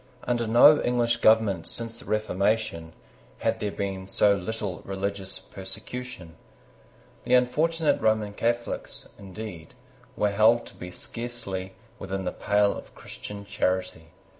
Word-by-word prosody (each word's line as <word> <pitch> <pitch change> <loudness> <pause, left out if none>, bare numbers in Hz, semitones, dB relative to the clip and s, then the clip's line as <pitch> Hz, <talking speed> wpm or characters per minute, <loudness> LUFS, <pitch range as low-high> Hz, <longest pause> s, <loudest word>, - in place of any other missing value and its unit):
Under 120 -2 0
no 120 +7 +7
English 120 -1 +2
government 110 -6 +4
since 115 0 -4
the - - -12
Reformation, 105 -5 0 0.4
had - - 0
there 105 - -1
been 95 -2 -4
so 100 +1 +4
little 100 0 -4
religious 95 0 -3
persecution. 95 -2 -7 0.9
The 125 - +4
unfortunate 155 +6 +2
Roman 110 -2 +2
Catholics, 120 +2 -2
indeed, 95 -4 -8 0.4
were 105 - +2
held 110 +3 +4
to - - -12
be 90 - -8
scarcely 95 -2 -5 0.2
within 95 -1 -4
the - - 0
pale 105 0 +2
of - - -10
Christian 100 -1 -9
charity. 95 -4 -1
105 Hz, 125 wpm, -27 LUFS, 95-115 Hz, 0.9 s, no